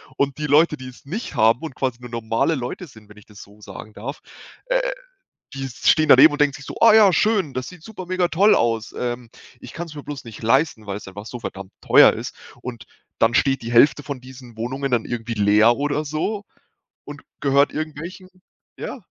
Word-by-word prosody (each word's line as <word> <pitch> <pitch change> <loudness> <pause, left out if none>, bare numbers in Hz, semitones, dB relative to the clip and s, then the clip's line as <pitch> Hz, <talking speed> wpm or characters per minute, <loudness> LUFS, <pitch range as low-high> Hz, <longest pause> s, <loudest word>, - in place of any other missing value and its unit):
und 140 0 -1
die 150 - -3
Leute, 150 +2 +3
die 130 -2 -9
es 125 - -17
nicht 200 - -5
haben 115 +3 +3
und 160 -5 -6
quasi 130 -2 -2
nur 120 - -10
normale 115 +6 0
Leute 130 +7 -5
sind“, 110 -8 -17
wenn 105 - -16
ich 105 - -16
das 105 -2 -14
so 105 +1 -16
sagen 105 +1 -11
darf, 130 +9 -7 0.5
äh, - - +2 0.7
die 135 0 -5
stehen 155 +5 +2
daneben 140 +5 +8
und 145 - -5
denken 145 -2 +3
sich 135 - -10
so: - - -8
„Oh 225 -1 +7
ja, 210 -4 +6
schön, 195 -6 +1
das 130 -1 -4
sieht 180 -1 -12
super 185 -2 -9
mega 185 -1 0
toll 200 +5 +4
aus. 115 -1 0
Ähm, 120 -1 -4 0.3
ich - - -11
kann's 165 -3 -7
mir 145 - -8
bloß 145 -2 -7
nicht 115 -1 -10
leisten, 115 -1 +1
weil's 100 0 -6
einfach 105 +3 -10
so 120 0 -8
verdammt 95 -3 -8
teuer - - +6
ist.“, - - -7 0.3
und 120 -3 -7 0.3
dann 115 +1 +3
steht 135 -2 +2
die 115 - -5
Hälfte 140 +4 +5
von 140 -4 -6
diesen 125 -2 -13
Wohnungen 130 +3 -4
dann 115 -2 +1
irgendwie 115 -1 -4
leer 105 +3 +4
oder 145 +2 -1
so 200 +8 -3 0.6
und 145 0 -10 0.2
gehört 140 0 +3
irgendwelchen 160 +5 -6 0.5
ja. - - -5
135 Hz, 205 wpm, -21 LUFS, 115-155 Hz, 0.7 s, daneben